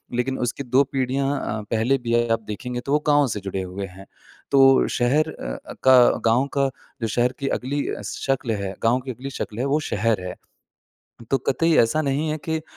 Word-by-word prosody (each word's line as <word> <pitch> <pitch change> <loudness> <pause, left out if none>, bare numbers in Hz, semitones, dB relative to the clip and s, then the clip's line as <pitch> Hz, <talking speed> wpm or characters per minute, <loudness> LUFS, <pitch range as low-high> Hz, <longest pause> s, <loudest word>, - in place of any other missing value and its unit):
लेकिन 130 +2 -1
उसकी 125 +3 -2
दो 130 +2 +3
पीढ़ियाँ 135 +1 -1
अ, 110 - -3
पहले 115 +4 +2
भी 120 -2 -3
अ, 120 0 +2
आप 115 - -1
देखेंगे 120 +4 -4
तो 140 - -3
वो 150 - +4
गाँव 145 -1 +4
से 105 -3 -3
जुड़े 95 0 -3
हुए 95 +2 -5
हैं। 95 +2 -13 0.5
तो 135 -1 +6
शहर 145 +6 +2
अ, - - -6
अ, - - -6
का 130 -2 +7 0.2
गाँव 120 +4 +3
का 135 -1 +3 0.3
जो 115 - 0
शहर 120 +3 +1
की 140 - -2
अगली 140 +3 -2 0.2
शक्ल 135 -3 -2
है 95 -1 -3
गाँव 120 +3 +3
की 130 - -3
अगली 130 +3 -7
शक्ल 115 -4 -5
है 130 - 0
वो 140 +2 +2
शहर 105 -1 +1
है। 90 - -5 1.0
तो 135 - +3
कतई 165 +5 +2
ऐसा 135 +8 +3
नहीं 145 +2 0
है 155 - -2
कि 160 0 +1
अ, - - -10
130 Hz, 210 wpm, -23 LUFS, 115-140 Hz, 1.0 s, का